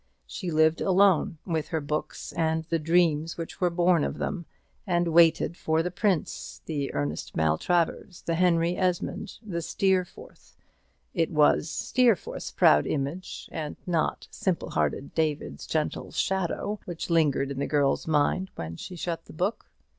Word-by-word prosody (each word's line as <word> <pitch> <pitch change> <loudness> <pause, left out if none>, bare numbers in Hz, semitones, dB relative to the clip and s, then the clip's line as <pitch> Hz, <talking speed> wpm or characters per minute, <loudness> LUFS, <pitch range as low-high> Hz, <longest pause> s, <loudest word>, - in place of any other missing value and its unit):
She 175 - -5
lived 160 0 +3
alone 190 -4 +3
with 160 -4 -1
her 160 - -1
books 150 +1 -4
and 160 -1 0
the 165 0 0
dreams 165 -1 +2
which 165 +2 -7
were 180 - +4
born 175 -2 +3
of - - -2
them, 175 -5 -3 0.4
and 175 -1 +1
waited 165 0 +4
for 160 -1 0
the 180 - -2
prince, 185 -3 -1
the 145 -4 -2
Ernest 75 +2 -3
Maltravers, 170 - 0
the 165 - -1
Henry 170 0 +2
Esmond, 180 -1 -2
the 170 -5 -3
Steerforth 185 +1 -2 0.6
it 165 -3 +1
was 150 0 +3
Steerforth's 240 +1 +1
proud 75 0 +4
image, 150 +6 -3
and 155 -2 -4
not 170 -3 -1
simple 185 -3 -2
hearted 80 - -1
David's 155 -2 -2
gentle 155 -1 -2
shadow, 190 +2 -1
which 175 0 -5
lingered 145 -4 +2
in 135 - -4
the - - -1
girl's 145 0 +1
mind 160 +5 +1
when 80 0 -6
she 180 - -8
shut 165 -1 -4
the - - -13
book. 185 +8 -2
165 Hz, 150 wpm, -27 LUFS, 150-180 Hz, 0.6 s, were